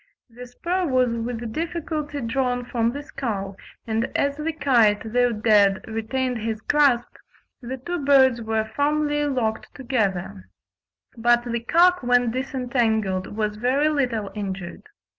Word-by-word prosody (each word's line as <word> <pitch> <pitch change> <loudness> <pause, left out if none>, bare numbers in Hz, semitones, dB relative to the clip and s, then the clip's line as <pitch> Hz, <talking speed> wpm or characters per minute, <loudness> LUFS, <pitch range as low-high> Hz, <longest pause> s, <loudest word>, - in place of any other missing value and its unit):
The 245 +2 -10
spur 350 +8 -2
was 255 -2 +2
with 230 -1 -4
difficulty 315 -3 -3
drawn 245 +1 -1
from 235 -1 0
the 285 +3 -6
skull, 205 -9 -4 0.3
and 225 0 0
as 280 0 +1
the 305 +2 -2
kite, 230 -8 +2
though 245 0 +3
dead, 210 -3 +3
retained 235 +3 -2
his 220 0 -3
grasp, 265 -1 +2 0.4
the 255 +2 -5
two 345 +4 -4
birds 265 -3 +5
were 220 -1 -1
firmly 295 0 +1
locked 240 -6 -2
together; 190 - -2 0.7
but 240 +1 +3
the 235 -1 -2
cock 350 +9 +3
when 245 -1 +2
disentangled 230 -7 -1
was 210 -1 -1
very 265 +6 +2
little 245 -9 -1
injured. 190 -4 -5
245 Hz, 135 wpm, -23 LUFS, 220-275 Hz, 0.7 s, birds